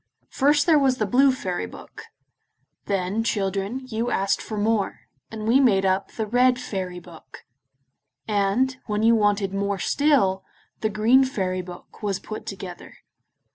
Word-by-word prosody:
First 290 +1 +3
there 315 -3 +5
was 265 -2 +2
the 215 - 0
Blue 265 +6 +4
Fairy 185 -9 -3
Book; - - -12 0.8
then, 195 +2 -1
children, 205 +3 -2
you 235 0 -2
asked 195 +1 0
for 215 - -6
more, 210 -1 0 0.3
and 220 -1 -6
we 245 +4 +5
made 200 -8 +3
up 190 +1 0
the 220 - -3
Red 250 +3 +3
Fairy 190 -7 -5
Book; 170 -2 -14 0.8
and, 215 +5 +1
when 210 0 -1
you 230 +1 +5
wanted 205 -3 +1
more 200 0 -1
still, 195 - +2 0.4
the 220 - 0
Green 225 +5 +4
Fairy 185 -8 -2
Book 180 +4 -12
was 200 -3 -2
put 215 - -8
together. 185 -2 -8
215 Hz, 150 wpm, -24 LUFS, 195-250 Hz, 0.8 s, there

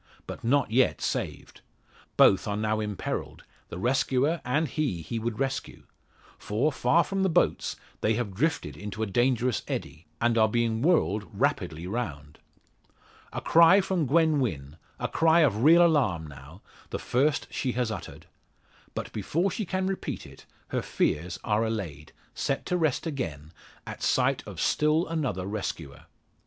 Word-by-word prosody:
But - - -8
not 135 0 +2
yet 130 +3 +3
saved. - - -4 0.6
Both 95 - +5
are 100 0 -1
now 110 0 0
imperilled 105 -2 -4 0.3
the - - -6
rescuer 135 - +1
and 150 +6 +1
he 130 - -2
he 115 +9 -4
would 115 -1 -3
rescue. 135 0 -3 0.6
For, 115 +9 0
far 135 +6 +3
from 195 +4 -2
the 190 - +2
boats, 160 - +1 0.2
they 110 +1 +1
have 110 -4 -3
drifted 115 - -1
into 105 +5 -5
a - - +1
dangerous 120 +2 +1
eddy, 75 +3 -5
and 115 0 +2
are 110 - +5
being 115 0 0
whirled 110 - +2
rapidly 80 +3 -1
round! 80 - -5 0.9
A - - -4
cry 170 +4 +6
from 185 -6 0
Gwen 160 +1 +3
Wynn 75 - -3 0.2
a - - -1
cry 165 +1 +4
of 115 -7 +2
real 170 +4 +7
alarm, 125 - +2
now 75 +5 -12 0.3
the - - -3
first 145 +4 +1
she 130 -3 -2
has 120 -2 -1
uttered! - - -8 0.7
But - - -5
before 165 - 0
she 215 - -3
can 185 +1 -1
repeat 190 0 -3
it, - - -15 0.2
her - - -1
fears 85 +4 -1
are 105 +1 +1
allayed 90 -10 -4 0.2
set 135 - -2
to 180 - -1
rest 160 -5 0
again 80 - -4 0.3
at - - -8
sight - - +2
of - - -8
still 155 +3 +2
another 135 - -2
rescuer. 95 -8 -5
120 Hz, 155 wpm, -27 LUFS, 95-155 Hz, 0.9 s, real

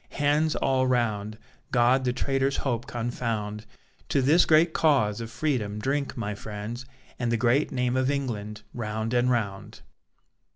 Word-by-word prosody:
Hands 150 +2 +2
all 130 -1 +1
round! 110 -4 0 0.3
God 125 +2 +3
the 125 - +2
traitor's 135 +2 0
hope 120 -2 -2
confound! 115 -3 -3 0.4
To 135 - +2
this 155 +6 +5
great 160 +1 +5
cause 120 -9 +2
of 115 - -5
Freedom 120 -5 -1
drink, 135 +5 -2
my 105 -2 -2
friends, 110 +4 -7 0.3
And 120 -1 0
the 115 - +2
great 125 +6 +2
name 125 -1 0
of 130 0 +1
England, 110 -7 -3
round 110 0 -3
and 125 +1 +3
round. 105 -6 -2
120 Hz, 150 wpm, -26 LUFS, 110-135 Hz, 0.4 s, this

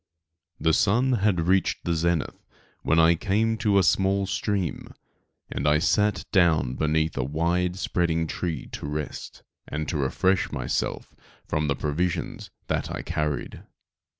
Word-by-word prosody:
The 80 - +2
sun 120 +10 +3
had 100 -6 +2
reached 95 0 +1
the 85 - +1
zenith 85 -1 -1 0.4
when 80 - +1
I 80 +1 +6
came 105 +6 +1
to 105 -3 +2
a 95 - +5
small 95 +3 +2
stream 95 -2 -2 0.6
and 70 - -2 0.2
sat 105 +3 +2
down 80 -9 +3
beneath 80 +2 0
a - - +1
wide 85 +6 0
spreading 85 -3 0
tree 80 -3 -3
to - - -6
rest, 75 +1 -6 0.2
and 75 0 -4
to - - -1
refresh 90 +7 +1
myself - - -3 0.3
from 75 0 0
the 70 - +1
provisions 80 +5 -2 0.2
that - - -2
I - - -5
carried. 75 -1 -3
85 Hz, 140 wpm, -25 LUFS, 75-95 Hz, 0.6 s, I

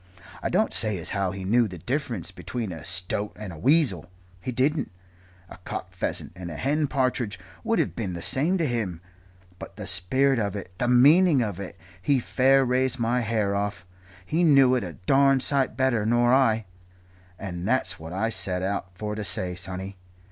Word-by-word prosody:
I - - -1
don't - - +1
say 110 -3 0
as 85 - -3
how 100 -2 0
he 95 +1 -6
knew 115 +5 +3
the 90 -3 -8
difference 120 - -3
between 95 +4 -5
a 80 -3 -8
stoat 95 +3 -2
and 105 -4 -7
a - - -10
weasel 125 - +2 0.3
he 130 - -4
didn't. 140 +5 0 0.6
A - - -12
cock 90 - -7
pheasant - - -3
and 90 -1 -7
a 80 - -7
hen 145 - 0
partridge 125 -6 0 0.3
would 230 0 +1
have - - 0
been 100 -6 -3
the 85 - -6
same 160 +8 +2
to 165 - 0
him. 110 - -2 0.6
But - - -9
the 105 0 -7
spirit 115 +9 +2
of 100 -2 -2
it 95 -2 -7
the 120 - +1
meaning 140 +4 +6
of 100 -4 -4
it 100 - -7 0.2
he 140 +8 +2
fair 135 +2 +3
raised 130 +1 +1
my 120 +1 +1
hair 110 -4 0
off 100 -1 -3 0.4
he 165 - 0
knew 135 -5 +6
it 125 - +1
a 90 -3 -6
darned 135 - +3
sight 140 -2 +1
better 130 -5 +2
nor 120 +2 +3
I. 115 -5 +3 0.7
And 90 -2 -5
that's 130 +3 0
what 80 0 -8
I 105 +5 -1
set 90 -4 -2
out 95 -2 -3
for 105 +2 -3
to 105 0 -4
say, 90 -1 -1
sonny. 95 +2 -6
110 Hz, 190 wpm, -25 LUFS, 95-130 Hz, 0.7 s, meaning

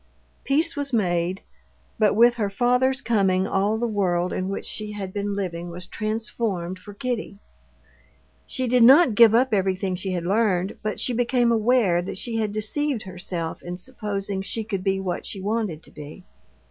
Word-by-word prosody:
Peace 315 +5 +1
was 285 -1 -2
made. 180 -4 0 0.6
But 210 -2 +3
with 235 +2 +6
her 215 -4 -1
father's 250 +5 +2
coming 195 -6 +2
all 200 +3 +1
the 240 - -1
world 185 -5 0
in 185 +1 -2
which 195 - -4
she 210 -1 -5
had 195 -2 -6
been 205 0 -2
living 175 -3 -4
was 175 +1 -8
transformed 215 -4 -3
for 205 - -11
Kitty. 235 -3 -4 1.1
She 260 -1 -2
did 250 +1 +3
not 270 +1 +7
give 225 +1 +7
up 250 0 +3
everything 190 -1 0
she 185 +1 -3
had 175 -2 -3
learned, 195 -2 +1
but 215 0 -3
she 250 - 0
became 240 0 +2
aware 220 -6 +3
that 185 - -6
she 230 +2 -3
had 215 -2 0
deceived 225 +4 -2
herself 180 -3 -5
in 175 0 -6
supposing 200 -3 -4
she 220 +3 -4
could 200 -4 -4
be 195 0 +1
what 185 -2 -3
she 200 - -6
wanted 200 -5 -2
to - - -15
be. 150 +5 -10
205 Hz, 175 wpm, -24 LUFS, 185-235 Hz, 1.1 s, not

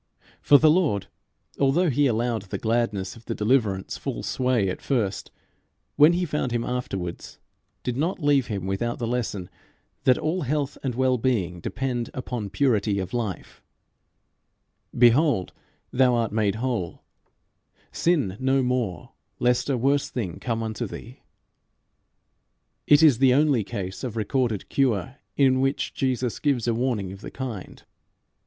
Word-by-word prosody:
For 145 - +7
the 155 +1 +5
Lord, 155 - +1 0.5
although 150 +5 +3
he 140 +2 +3
allowed 115 -2 -1
the 95 - -4
gladness 110 -5 -1
of 115 -1 -16
the - - -3
deliverance 105 -4 0
full - - -5
sway 125 -6 +1
at 95 - -4
first, 110 -9 -1 0.7
when 150 +4 +6
he 180 +1 0
found 150 -5 -2
him 120 -1 0
afterwards 95 -9 -4 0.5
did 125 - -2
not 165 +9 -1
leave 145 -4 +2
him 100 -5 -4
without 95 +5 -2
the 120 - -3
lesson 115 -6 -2 0.6
that 130 - +5
all 170 +4 -1
health 145 0 -1
and 130 -4 -3
well 130 -1 +2
being 100 -9 0
depend 120 +4 -3
upon 120 -5 -4
purity 110 -5 +1
of 95 -1 -4
life: 115 -6 -4 1.4
"Behold, 120 - +4 0.4
thou 125 -1 +4
art 115 -2 0
made 105 -2 +1
whole: 115 -7 -3 0.9
sin 140 - +1
no 135 0 +2
more 125 -7 -2 0.3
lest 125 +2 +1
a 135 - +1
worse 140 +3 +1
thing 100 -9 -4
come 115 -2 -2
unto 110 -1 -3
thee." 125 +4 -10 1.7
It 150 +2 +6
is 140 -7 +6
the 130 -2 +5
only 145 -6 +3
case 95 +1 -6
of 120 -3 -4
recorded 115 -1 -1
cure 130 -1 0 0.2
in 130 -2 +4
which 135 +1 -1
Jesus 130 -3 -1
gives 135 -6 0
a 120 - +2
warning 115 -6 -1
of 95 +1 -10
the - - -7
kind. 120 -8 -7
125 Hz, 150 wpm, -25 LUFS, 105-135 Hz, 1.7 s, For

